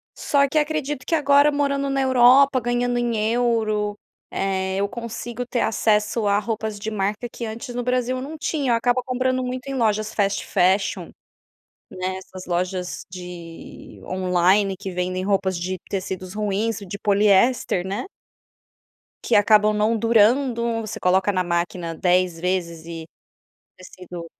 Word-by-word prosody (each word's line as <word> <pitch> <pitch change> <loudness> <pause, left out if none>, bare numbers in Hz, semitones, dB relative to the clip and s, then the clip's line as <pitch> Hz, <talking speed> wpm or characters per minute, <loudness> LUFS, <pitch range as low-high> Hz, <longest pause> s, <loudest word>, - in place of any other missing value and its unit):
Só 280 -1 +2
que 310 - -2
acredito 295 -3 -1
que 330 - +1
agora 285 -1 +4
morando 280 -1 0
na 275 0 0
Europa 260 +1 +5
ganhando 245 +1 0
em 240 -1 0 0.2
euro, 220 -4 0 0.3
eh, 190 -1 -1
eu 200 +1 +1
consigo 235 +1 -6
ter 245 -1 -2
acesso 215 0 +1
a 200 0 +3
roupas 220 0 -3
de 220 +2 -4
marca 210 +3 -2
que 235 - -6
antes 230 +3 -6
no 245 0 -3
Brasil 250 0 0
eu - - -5
não 300 +4 -7
tinha. 285 -5 0
Eu - - +4
acabo 245 +2 +1
comprando 255 0 0
muito 255 +1 -5
em 275 - -3
lojas 215 -3 0
fast 200 -1 0
fashion. 190 +3 +1 0.8
Né, 185 0 -3
essas 185 0 -10
lojas 180 +1 -2
de 175 -2 -10
online 185 +2 +2
que 195 0 -6
vendem 185 +1 -2
roupas 190 -2 0
de 185 +2 -3
tecidos 185 -1 -4
ruins 210 +1 -1
de 200 0 -7
poliéster, 205 -1 +2
né. 195 - -3 1.2
Que - - +1
acabam 210 0 +5
não 210 +2 +1
durando. 235 +1 +2
Você 215 - -6
coloca 185 +2 +2
na 185 -2 0
máquina 170 0 -2
10 180 0 +1
vezes 170 -2 -2
e 165 -1 -7 0.7
tecido, 180 -2 -10
210 Hz, 150 wpm, -22 LUFS, 185-245 Hz, 1.2 s, Europa